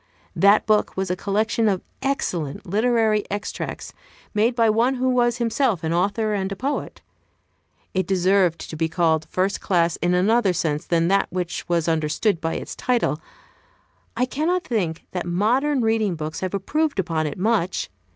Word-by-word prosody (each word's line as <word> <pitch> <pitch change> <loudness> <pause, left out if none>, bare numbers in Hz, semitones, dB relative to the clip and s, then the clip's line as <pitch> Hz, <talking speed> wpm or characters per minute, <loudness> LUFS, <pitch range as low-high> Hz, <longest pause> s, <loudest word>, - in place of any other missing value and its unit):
That 200 +2 +5
book 215 -3 +1
was 190 -1 -1
a - - 0
collection 215 +4 0
of 190 -3 -1 0.2
excellent 175 - -2
literary 220 +1 +2
extracts, 205 +1 -5 0.4
made 225 +3 +2
by 230 -2 +3
one 230 +5 +2
who 255 0 0
was 240 -1 +2
himself 235 - 0
an 160 +1 0
author 205 +5 0
and 195 -1 -2
a - - -3
poet. 275 +8 -4 0.9
It 185 -2 0
deserved 185 -2 +2
to - - -7
be 160 +1 -1
called 160 -2 +1
"first 190 +2 -1
class" 170 -3 +1
in 175 0 +1
another 200 +2 +3
sense 150 -3 -2
than 170 -1 +2
that 195 +1 +3
which 180 -1 -4
was 170 -2 +1
understood 165 +4 0
by 165 0 -2
its - - -6
title. 235 -11 0 1.0
I 250 - +2
cannot 325 +8 -1
think 180 - -2
that 180 -1 -4
modern 250 +10 +1
reading 220 -4 +1
books 155 0 -5
have 185 +1 -3
improved 300 +9 -1
upon 165 -4 0
it 145 - -5
much. 190 - 0
195 Hz, 165 wpm, -23 LUFS, 170-230 Hz, 1.0 s, That